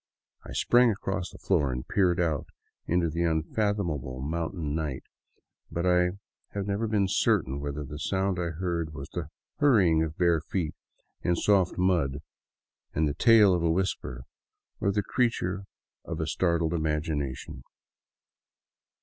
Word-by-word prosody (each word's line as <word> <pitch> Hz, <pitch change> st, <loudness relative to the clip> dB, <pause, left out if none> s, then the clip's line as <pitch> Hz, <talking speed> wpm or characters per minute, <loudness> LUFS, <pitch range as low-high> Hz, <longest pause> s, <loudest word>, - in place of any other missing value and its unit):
I -, -, -9 dB
sprang 120 Hz, 0 st, +4 dB
across 100 Hz, -3 st, -2 dB
the -, -, -13 dB
floor 75 Hz, -8 st, +1 dB
and 65 Hz, +2 st, -5 dB
peered 90 Hz, -3 st, +2 dB
out 80 Hz, -5 st, 0 dB, 0.4 s
into 85 Hz, 0 st, +2 dB
the 85 Hz, +2 st, -2 dB
unfathomable 80 Hz, -, -1 dB
mountain 80 Hz, +2 st, -3 dB
night; 75 Hz, -4 st, -3 dB, 0.7 s
but 85 Hz, +1 st, -2 dB
I 90 Hz, 0 st, +3 dB, 0.4 s
have 100 Hz, -1 st, -1 dB
never 100 Hz, +3 st, -1 dB
been 105 Hz, -3 st, +2 dB
certain 70 Hz, -6 st, +1 dB
whether 70 Hz, +1 st, -4 dB
the 75 Hz, +1 st, -8 dB
sound 95 Hz, +2 st, 0 dB
I 85 Hz, -1 st, -1 dB
heard 85 Hz, -2 st, -3 dB
was 70 Hz, 0 st, -7 dB
the 85 Hz, -4 st, -5 dB, 0.3 s
hurrying 100 Hz, -, +5 dB
of 80 Hz, -1 st, -2 dB
bare 85 Hz, -3 st, +3 dB
feet 80 Hz, -1 st, -2 dB, 0.5 s
in 85 Hz, -, +1 dB
soft 95 Hz, 0 st, +2 dB
mud 85 Hz, -7 st, +1 dB, 0.7 s
and 80 Hz, 0 st, +2 dB
the 70 Hz, -, -1 dB
tail 105 Hz, +3 st, +6 dB
of 90 Hz, -, +1 dB
a 85 Hz, -, +2 dB
whisper, 85 Hz, -8 st, -1 dB, 0.6 s
or 100 Hz, -, +1 dB
the 105 Hz, +1 st, 0 dB
creature 100 Hz, -6 st, 0 dB, 0.4 s
of 85 Hz, -1 st, -5 dB
a 80 Hz, -, 0 dB
startled 85 Hz, -1 st, +1 dB
imagination. 75 Hz, -4 st, -2 dB
85 Hz, 145 wpm, -28 LUFS, 75-95 Hz, 0.7 s, tail